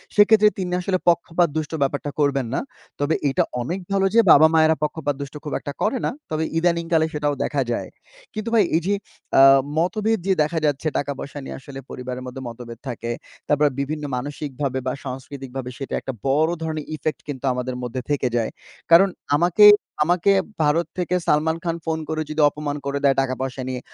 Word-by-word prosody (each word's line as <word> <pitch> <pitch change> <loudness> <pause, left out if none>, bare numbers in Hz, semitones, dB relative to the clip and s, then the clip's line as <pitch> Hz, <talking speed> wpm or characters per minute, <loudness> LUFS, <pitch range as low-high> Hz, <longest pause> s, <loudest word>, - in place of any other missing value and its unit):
সেক্ষেত্রে 210 0 +6
তিনি 180 -2 -3
আসলে 185 0 0
পক্ষপাতদুষ্ট 165 -3 +1
ব্যাপারটা 145 +1 -1
করবেন 140 -4 +1
না। - - +1 0.4
তবে 145 +2 +1
এইটা 135 - +2 0.2
অনেক 175 +10 -3
ভালো 195 -1 +2
যে - - +7
বাবা-মায়েরা 160 +1 +6
পক্ষপাতদুষ্ট 145 -3 -3
খুব 150 - -5
একটা 145 - -6
করে 235 +5 +1
না। - - 0 0.2
তবে 155 +1 0
ইদানিংকালে 170 -1 +2
সেটাও 145 -1 0
দেখা 140 -2 0
যায়। - - -2 0.5
কিন্তু 215 +1 -4
ভাই 220 -3 +6
এই 170 - +3
যে 205 - +2 0.5
আ - - +9 0.4
মতভেদ 215 +5 +1
যে 190 - +4
দেখা 160 +2 -1
যাচ্ছে 145 +1 0
টাকা-পয়সা 140 0 -4
নিয়ে - - -7
আসলে 135 0 -9
পরিবারের 125 0 -6
মধ্যে 130 +1 -7
মতভেদ 115 0 -9
থাকে। 120 0 -4 0.4
তারপর 150 0 +3
বিভিন্ন 150 +2 -3
মানসিকভাবে 135 0 -3
বা 130 - 0
সাংস্কৃতিকভাবে 130 0 -6
সেটা 135 - -6
একটা 135 - -5
বড় 155 +5 +3
ধরনের 155 -2 -3
ইফেক্ট 150 -1 -3
কিন্তু 135 -1 -5
আমাদের 125 0 -3
মধ্যে 125 +1 -4
থেকে 140 -3 +1
যায়। 115 - -1 0.4
কারণ 190 +4 +8 0.3
আমাকে 175 +5 +5 0.4
আমাকে 180 +3 +3 0.3
ভারত 155 +3 +2
থেকে 180 0 0
সালমান 160 +2 +2
খান 165 -1 -1
ফোন 160 0 -1
করে 155 0 -1
যদি 155 0 0
অপমান 145 0 -4
করে 140 0 -1
দেয় 135 -1 +4
টাকা-পয়সা 130 0 -3
নিয়ে 130 -1 -3
150 Hz, 175 wpm, -22 LUFS, 135-170 Hz, 0.5 s, আ